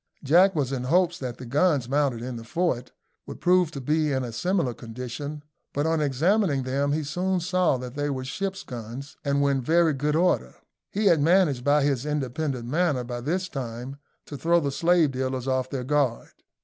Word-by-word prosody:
Jack 175 Hz, +7 st, +5 dB
was 140 Hz, -4 st, 0 dB
in 125 Hz, -2 st, -3 dB
hopes 175 Hz, +4 st, +2 dB
that 125 Hz, -3 st, -5 dB
the 130 Hz, -, -9 dB
guns 140 Hz, 0 st, +2 dB
mounted 135 Hz, -4 st, 0 dB
in 125 Hz, 0 st, -5 dB
the 115 Hz, -, -7 dB
fort 125 Hz, -1 st, -1 dB, 0.4 s
would -, -, -8 dB
prove 180 Hz, -2 st, +3 dB
to 140 Hz, -, -7 dB
be 150 Hz, +3 st, +1 dB
in 130 Hz, -1 st, 0 dB
a 120 Hz, -, -5 dB
similar 165 Hz, -, 0 dB
condition; 125 Hz, +6 st, -7 dB, 0.3 s
but 145 Hz, +2 st, 0 dB
on 160 Hz, -1 st, +1 dB
examining 150 Hz, -, +2 dB
them 140 Hz, +2 st, 0 dB
he 155 Hz, +1 st, 0 dB
soon 180 Hz, +5 st, -1 dB
saw 180 Hz, -4 st, +1 dB
that 125 Hz, -1 st, -7 dB
they 145 Hz, +1 st, -2 dB
were 130 Hz, -2 st, -3 dB
ship's 190 Hz, +8 st, -4 dB
guns, 120 Hz, +3 st, -8 dB
and 140 Hz, -1 st, +1 dB
were 140 Hz, -, +3 dB
in 135 Hz, -1 st, 0 dB
very 165 Hz, +4 st, +3 dB
good 150 Hz, +2 st, 0 dB
order. 165 Hz, -, +1 dB, 0.3 s
He 210 Hz, +2 st, -2 dB
had 165 Hz, -6 st, +5 dB
managed 160 Hz, -6 st, +3 dB
by 145 Hz, +1 st, +3 dB
his 140 Hz, -3 st, +1 dB
independent 140 Hz, -3 st, -2 dB
manner, 150 Hz, -2 st, +1 dB
by 120 Hz, 0 st, -5 dB
this 180 Hz, +8 st, -1 dB
time, 125 Hz, -2 st, -6 dB, 0.3 s
to 145 Hz, -, -8 dB
throw 170 Hz, +4 st, +3 dB
the 140 Hz, -4 st, -1 dB
slave 170 Hz, 0 st, +3 dB
dealers 130 Hz, 0 st, -3 dB
off 130 Hz, -1 st, 0 dB
their 130 Hz, -2 st, -3 dB
guard. 135 Hz, -3 st, 0 dB
140 Hz, 200 wpm, -25 LUFS, 130-165 Hz, 0.4 s, Jack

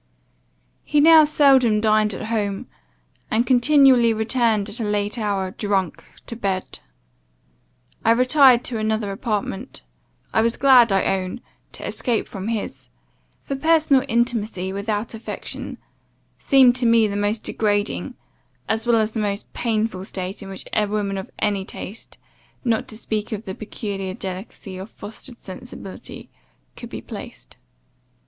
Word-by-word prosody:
"He 300 Hz, -, +1 dB
now 315 Hz, +1 st, +8 dB
seldom 270 Hz, -7 st, +4 dB
dined 215 Hz, -1 st, +2 dB
at -, -, -6 dB
home, 205 Hz, -3 st, -1 dB, 0.6 s
and 230 Hz, +2 st, +1 dB
continually 255 Hz, -2 st, +5 dB
returned 220 Hz, -2 st, +1 dB
at 210 Hz, +4 st, -5 dB
a -, -, -1 dB
late 210 Hz, +1 st, -1 dB
hour, 200 Hz, -3 st, -1 dB
drunk, 195 Hz, -4 st, -2 dB, 0.2 s
to 235 Hz, -, -7 dB
bed. 195 Hz, -4 st, -3 dB, 1.2 s
I -, -, +2 dB
retired 255 Hz, +1 st, +5 dB
to 235 Hz, -3 st, -1 dB
another 215 Hz, -1 st, -1 dB
apartment; 210 Hz, +2 st, -4 dB, 0.5 s
I 220 Hz, -, +4 dB
was 230 Hz, +1 st, 0 dB
glad, 255 Hz, -5 st, +6 dB
I 195 Hz, -1 st, +3 dB
own, 185 Hz, +2 st, -1 dB, 0.3 s
to -, -, -8 dB
escape 235 Hz, -3 st, -1 dB
from 195 Hz, 0 st, -6 dB
his; 225 Hz, -2 st, -4 dB, 0.5 s
for 275 Hz, -, -3 dB
personal 305 Hz, -2 st, +3 dB
intimacy 225 Hz, -6 st, 0 dB
without 210 Hz, +3 st, -3 dB
affection, 225 Hz, 0 st, -6 dB, 0.6 s
seemed, 260 Hz, -3 st, +5 dB
to 245 Hz, -2 st, +1 dB
me 230 Hz, -1 st, +5 dB
the 200 Hz, -1 st, -2 dB
most 205 Hz, +2 st, -1 dB
degrading, 205 Hz, -1 st, -1 dB, 0.5 s
as 225 Hz, +2 st, -1 dB
well 235 Hz, -1 st, +4 dB
as 220 Hz, 0 st, +1 dB
the 220 Hz, -, -3 dB
most 205 Hz, -1 st, -3 dB
painful 220 Hz, -5 st, -1 dB
state 190 Hz, +1 st, -5 dB
in 195 Hz, -, -8 dB
which 195 Hz, -, -8 dB
a 210 Hz, -1 st, +2 dB
woman 200 Hz, -1 st, -2 dB
of 190 Hz, -, -8 dB
any 200 Hz, -2 st, 0 dB
taste, 205 Hz, +3 st, -9 dB, 0.5 s
not 225 Hz, -2 st, +1 dB
to 215 Hz, -, -9 dB
speak 215 Hz, -2 st, -3 dB
of 215 Hz, 0 st, -5 dB
the 190 Hz, -, -5 dB
peculiar 195 Hz, -3 st, -5 dB
delicacy 190 Hz, -1 st, -7 dB
of 190 Hz, +3 st, -8 dB
fostered 230 Hz, +4 st, -11 dB
sensibility, 190 Hz, -1 st, -10 dB, 0.4 s
could -, -, -9 dB
be -, -, -7 dB
placed. -, -, -10 dB
215 Hz, 145 wpm, -22 LUFS, 200-240 Hz, 1.2 s, now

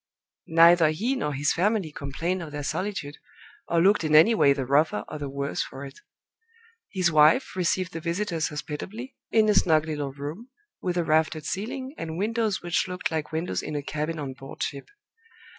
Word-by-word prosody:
Neither 165 Hz, -1 st, +6 dB
he 220 Hz, +13 st, -1 dB
nor 190 Hz, -, -2 dB
his 145 Hz, +2 st, +1 dB
family 195 Hz, -2 st, 0 dB
complained 165 Hz, +6 st, -3 dB
of 160 Hz, -3 st, -7 dB
their 145 Hz, 0 st, -5 dB
solitude, 155 Hz, -3 st, -3 dB, 0.5 s
or 170 Hz, 0 st, +2 dB
looked 200 Hz, -1 st, +4 dB
in 155 Hz, -1 st, +2 dB
any 165 Hz, +10 st, +7 dB
way 145 Hz, -10 st, +4 dB
the 140 Hz, -2 st, 0 dB
rougher 140 Hz, -5 st, +2 dB
or 155 Hz, -, -7 dB
the 145 Hz, -1 st, -4 dB
worse 140 Hz, +1 st, -2 dB
for 135 Hz, +1 st, -6 dB
it. 135 Hz, -, -11 dB, 0.9 s
His 185 Hz, -3 st, +1 dB
wife 155 Hz, -, +4 dB
received 185 Hz, 0 st, 0 dB
the 165 Hz, -, -4 dB
visitors 170 Hz, -1 st, -1 dB
hospitably, 185 Hz, -, -6 dB
in 220 Hz, -1 st, +4 dB
a 210 Hz, -, +4 dB
snug 160 Hz, -5 st, +3 dB
little 145 Hz, -3 st, -3 dB
room, 150 Hz, -, -7 dB, 0.3 s
with 180 Hz, -1 st, -2 dB
a 175 Hz, -, +2 dB
raftered 155 Hz, 0 st, +1 dB
ceiling, 260 Hz, -, -4 dB
and 160 Hz, 0 st, -5 dB
windows 220 Hz, 0 st, -1 dB
which 175 Hz, +1 st, 0 dB
looked 180 Hz, -1 st, -3 dB
like 155 Hz, -2 st, -3 dB
windows 160 Hz, +3 st, -2 dB
in 155 Hz, -, -5 dB
a 145 Hz, -, -2 dB
cabin 155 Hz, +3 st, -3 dB
on 140 Hz, -3 st, -5 dB
board 135 Hz, +1 st, -7 dB
ship. 140 Hz, -1 st, -5 dB
160 Hz, 185 wpm, -26 LUFS, 150-185 Hz, 0.9 s, any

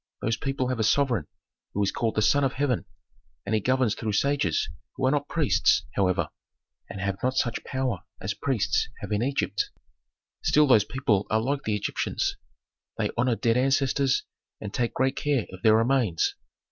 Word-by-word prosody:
Those 115 Hz, +1 st, +1 dB
people 135 Hz, -2 st, -2 dB
have 130 Hz, -2 st, -2 dB
a -, -, +2 dB
sovereign 115 Hz, -, +2 dB, 0.5 s
who 105 Hz, -, +2 dB
is 100 Hz, -, +1 dB
called 115 Hz, -2 st, -1 dB
the 110 Hz, -, +2 dB
Son 140 Hz, +7 st, +4 dB
of 135 Hz, -, +1 dB
Heaven, 130 Hz, -6 st, 0 dB, 0.6 s
and 100 Hz, -, -2 dB
he 110 Hz, -, +2 dB
governs 130 Hz, -1 st, +2 dB
through 110 Hz, -1 st, -3 dB
sages, 135 Hz, -, +1 dB, 0.3 s
who 135 Hz, -, -1 dB
are 130 Hz, -, +4 dB
not 145 Hz, 0 st, 0 dB
priests, 155 Hz, -5 st, +2 dB
however, 95 Hz, -2 st, +1 dB, 0.6 s
and 100 Hz, -, -7 dB
have 100 Hz, 0 st, -2 dB
not 130 Hz, +1 st, 0 dB
such 120 Hz, -2 st, 0 dB
power 130 Hz, -7 st, -2 dB, 0.2 s
as 95 Hz, +1 st, -3 dB
priests 110 Hz, -2 st, 0 dB
have -, -, -6 dB
in 105 Hz, 0 st, +1 dB
Egypt. 135 Hz, +3 st, -1 dB, 0.7 s
Still 150 Hz, 0 st, +4 dB
those 110 Hz, -7 st, +5 dB
people 105 Hz, -5 st, 0 dB
are 110 Hz, -, +2 dB
like 140 Hz, +5 st, -2 dB
the 105 Hz, -, +1 dB
Egyptians. 105 Hz, -, -1 dB, 0.6 s
They -, -, 0 dB
honor 120 Hz, 0 st, +2 dB
dead 115 Hz, +1 st, +1 dB
ancestors 135 Hz, +1 st, +2 dB, 0.4 s
and 105 Hz, -1 st, -7 dB
take 120 Hz, -1 st, -1 dB
great 130 Hz, +1 st, +1 dB
care 140 Hz, -6 st, 0 dB
of 95 Hz, -, -10 dB
their 110 Hz, +1 st, +5 dB
remains. 115 Hz, -7 st, +2 dB
120 Hz, 180 wpm, -26 LUFS, 105-135 Hz, 0.7 s, those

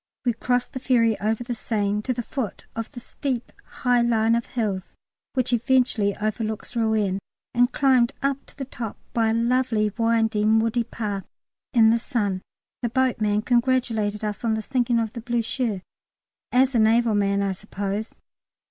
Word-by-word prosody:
We 240 Hz, -, +3 dB
crossed 245 Hz, +2 st, -1 dB
the 260 Hz, -, -4 dB
ferry 235 Hz, -4 st, +3 dB
over 220 Hz, +3 st, 0 dB
the 240 Hz, 0 st, -3 dB
Seine 210 Hz, -2 st, -1 dB
to 255 Hz, -, -2 dB
the 240 Hz, -1 st, -2 dB
foot 230 Hz, -4 st, -4 dB
of 225 Hz, -1 st, -4 dB
the 245 Hz, -, -8 dB
steep 250 Hz, 0 st, -4 dB
high 245 Hz, -1 st, +1 dB
line 230 Hz, -1 st, +3 dB
of 235 Hz, 0 st, 0 dB
hills 205 Hz, -6 st, -3 dB, 0.4 s
which 255 Hz, -2 st, 0 dB
eventually 240 Hz, -4 st, +2 dB
overlooks 215 Hz, +2 st, -3 dB
Rouen, 215 Hz, -4 st, +1 dB, 0.3 s
and 245 Hz, +2 st, +3 dB
climbed 260 Hz, -3 st, +3 dB
up 275 Hz, 0 st, 0 dB
to -, -, -16 dB
the 270 Hz, -, -4 dB
top 235 Hz, -4 st, -6 dB, 0.2 s
by 225 Hz, -1 st, +2 dB
a -, -, +2 dB
lovely 230 Hz, -3 st, +1 dB
winding 225 Hz, -1 st, +3 dB
woody 230 Hz, +1 st, +1 dB
path 210 Hz, -4 st, -4 dB, 0.4 s
in 225 Hz, -4 st, +6 dB
the 230 Hz, -, +3 dB
sun. 205 Hz, -7 st, -1 dB, 0.4 s
(The 240 Hz, -, 0 dB
boatman 220 Hz, -4 st, +1 dB
congratulated 235 Hz, -4 st, +1 dB
us 210 Hz, +1 st, -4 dB
on 225 Hz, -2 st, +2 dB
the 220 Hz, -, -3 dB
sinking 245 Hz, -1 st, +1 dB
of 225 Hz, -1 st, -1 dB
the 235 Hz, -, -6 dB
Blücher, 230 Hz, -3 st, -1 dB, 0.7 s
as 260 Hz, +1 st, +4 dB
a 235 Hz, -, +3 dB
naval 225 Hz, +1 st, +4 dB
man, 200 Hz, -1 st, +2 dB
I 195 Hz, -, 0 dB
suppose.) 200 Hz, +2 st, -4 dB
230 Hz, 165 wpm, -24 LUFS, 215-245 Hz, 0.7 s, in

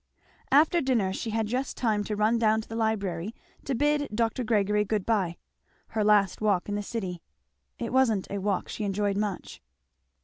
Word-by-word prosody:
After 315 Hz, +5 st, +5 dB
dinner 230 Hz, -8 st, +1 dB
she 225 Hz, -, -4 dB
had 220 Hz, 0 st, 0 dB
just 250 Hz, +5 st, -2 dB
time 215 Hz, -4 st, +1 dB
to 210 Hz, -, -2 dB
run 215 Hz, +3 st, +2 dB
down 220 Hz, -1 st, +3 dB
to -, -, -14 dB
the 225 Hz, -, -7 dB
library 210 Hz, -3 st, -1 dB, 0.3 s
to 270 Hz, -, -1 dB
bid 290 Hz, +2 st, +1 dB
Dr. 230 Hz, +3 st, 0 dB
Gregory 210 Hz, -2 st, +2 dB
good 210 Hz, -1 st, -1 dB
bye; 190 Hz, -7 st, 0 dB, 0.5 s
her 220 Hz, -1 st, 0 dB
last 205 Hz, -2 st, +3 dB
walk 200 Hz, -4 st, +1 dB
in 205 Hz, -, -3 dB
the 205 Hz, -, -1 dB
city. 190 Hz, -5 st, -4 dB, 0.6 s
It 235 Hz, -1 st, -4 dB
wasn't 230 Hz, -7 st, +3 dB
a 200 Hz, -, -2 dB
walk 195 Hz, -1 st, -1 dB
she 215 Hz, -, -5 dB
enjoyed 200 Hz, 0 st, 0 dB
much. 205 Hz, -2 st, -3 dB
215 Hz, 180 wpm, -27 LUFS, 200-230 Hz, 0.6 s, After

